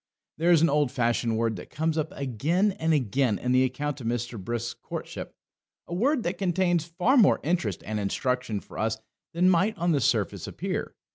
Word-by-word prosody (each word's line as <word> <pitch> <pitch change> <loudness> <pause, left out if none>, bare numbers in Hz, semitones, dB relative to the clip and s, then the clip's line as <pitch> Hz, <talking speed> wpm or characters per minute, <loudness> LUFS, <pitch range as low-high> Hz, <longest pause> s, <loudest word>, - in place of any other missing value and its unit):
There 170 +2 +2
is 165 -2 +6
an 165 - +5
old 145 -3 +2
fashioned 120 -2 0
word 115 -1 0
that - - -10
comes 160 +1 -1
up 155 -1 -1
again 145 - 0
and 160 0 +1
again 130 -5 +1
in 125 - -2
the 130 +1 +5
account 145 +2 -2
of 115 - -4
Mr. 120 -3 -3
Brisk's 120 +3 -3
courtship, - - -7 0.5
a - - -7
word 250 - +1
that 175 +1 -3
contains 175 -3 +1
far 180 - +2
more 225 - +5
interest 150 - -1
and 110 +1 -2
instruction 115 +1 -1
for - - -10
us 110 0 0 0.4
than 175 +2 +3
might 185 +4 +3
on 175 0 +1
the 145 -3 +2
surface - - 0
appear. - - -4
145 Hz, 195 wpm, -27 LUFS, 120-175 Hz, 0.5 s, is